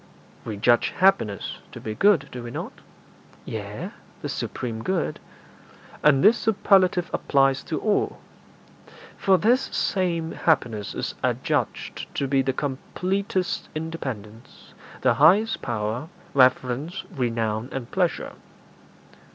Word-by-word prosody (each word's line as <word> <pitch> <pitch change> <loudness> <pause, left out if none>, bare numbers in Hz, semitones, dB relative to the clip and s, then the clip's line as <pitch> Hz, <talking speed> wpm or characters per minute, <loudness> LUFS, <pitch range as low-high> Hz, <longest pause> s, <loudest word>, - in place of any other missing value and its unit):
'We 110 -2 -4
judge 120 +3 +3
happiness 150 - +2
to - - -9
be 110 - -5
good, 205 - +4
do 125 - -6
we 120 - -7
not?' - - -7 0.6
'Yea, 105 -1 -5 0.3
the - - -3
supreme 115 -3 -4
good.' 185 -2 -1 0.8
'And 145 -2 +5
this 220 +3 +6
superlative 190 -4 +3
applies 135 -1 +2
to 165 - -2
all; 215 -2 0 1.0
for 190 -1 +3
this 240 +8 +3
same 170 -9 -1
happiness 115 -10 0
is - - -3
adjudged - - -1
to 140 - 0
be 135 0 +3
the 135 0 0
completest 180 +8 -2
independence, 130 -9 -7 0.3
the - - +4
highest 215 +6 +4
power, 115 +3 -2 0.3
reverence, 130 +5 +2
renown, 115 -2 -1
and 130 -3 -5
pleasure.' - - 0
135 Hz, 115 wpm, -25 LUFS, 120-185 Hz, 1.0 s, this